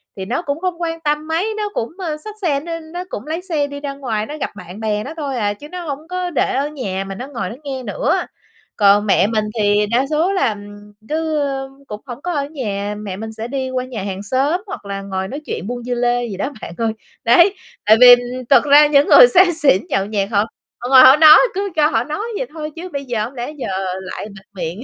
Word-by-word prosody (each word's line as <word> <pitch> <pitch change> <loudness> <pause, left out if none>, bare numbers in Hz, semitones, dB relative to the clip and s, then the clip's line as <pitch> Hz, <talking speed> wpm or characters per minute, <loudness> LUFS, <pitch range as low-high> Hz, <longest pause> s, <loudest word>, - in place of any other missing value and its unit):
thì 190 - -5
nó 240 - -2
cũng 285 -2 -3
không 355 -2 -3
quan 330 -1 -2
tâm 300 0 -1
mấy, 360 +7 -1
nó 420 -1 -2
cũng, 230 - -2
ơ, 330 -6 -3
xách 420 +7 -9
xe 295 -7 +1
nó 330 +2 -5
nó 330 +3 -7
cũng 235 +8 -7
lấy 325 +3 -3
xe 320 -6 -1
đi 285 0 -7
ra 285 -1 -5
ngoài, 230 -6 -3
nó 300 +6 -7
gặp 275 - -3
bạn 180 0 -10
bè 215 -1 -1
nó - - -7
thôi 285 -4 -3
à, 205 -2 0
chứ 290 +8 -12
nó 360 +1 -6
hổng 290 +3 -5
có 365 0 -3
để 320 - 0
ở 275 +2 0
nhà 200 -10 -4
mà 195 0 -7
nó 250 +7 -7
ngồi 240 -9 -4
nó 225 - -7
nghe 265 -3 -5
nữa. 255 - 0 0.6
Còn 205 0 +4
mẹ 195 -1 +3
mình 215 -1 0 0.2
thì 205 0 +3
đa 255 +3 +2
số 320 +5 +1
là, 375 - +2
ừm, 205 0 -13 0.2
cứ 315 0 -1 0.5
cũng 210 0 -7
hổng 250 0 -8
có 355 +2 -3
ở 285 -3 -1
nhà, 210 -8 -4
mẹ 205 -3 -6
mình 220 +3 -6
sẽ 220 +1 -6
đi 265 0 -3
qua 255 0 -2
nhà 235 -6 -6
hàng 195 0 -5
xóm 275 - 0
hoặc 380 - -7
là 195 0 -5
ngồi 190 -1 -4
nói 280 +8 -6
chuyện 195 - -5
buôn 245 0 -5
dưa 245 +1 -3
lê 245 0 +1
gì 195 -4 -6
đó, 270 - -2
bạn - - -7
ơi, 225 -1 0 0.3
đấy. 345 +12 +5 0.3
Tại 220 +1 +6
vì, 250 - +10
ừm, 245 +1 +4
thật 270 -4 +6
ra 295 +1 +7
những 285 -1 +4
người - - +9
say 365 -4 +5
xỉn 285 - +3
nhậu 195 - 0
nhẹt 205 -1 -2
họ 205 - +1 0.4
họ 245 - -5
ngồi 260 -1 +8
họ 260 +1 +9
nói, 310 0 +9 0.2
cứ 400 +1 -1
cho 300 -1 +4
họ 225 -4 +1
nói 300 +6 -5 0.2
vậy - - -3
thôi 310 -1 -6
chứ 350 +2 -7
bây 280 -1 -4
giờ 230 -4 -2
hổng 250 - -9
lẽ 245 +2 -5
giờ 270 - -4 0.3
lại 185 +2 -7
bịt 200 -1 -14
miệng, 180 0 -5
260 Hz, 255 wpm, -18 LUFS, 210-310 Hz, 0.6 s, vì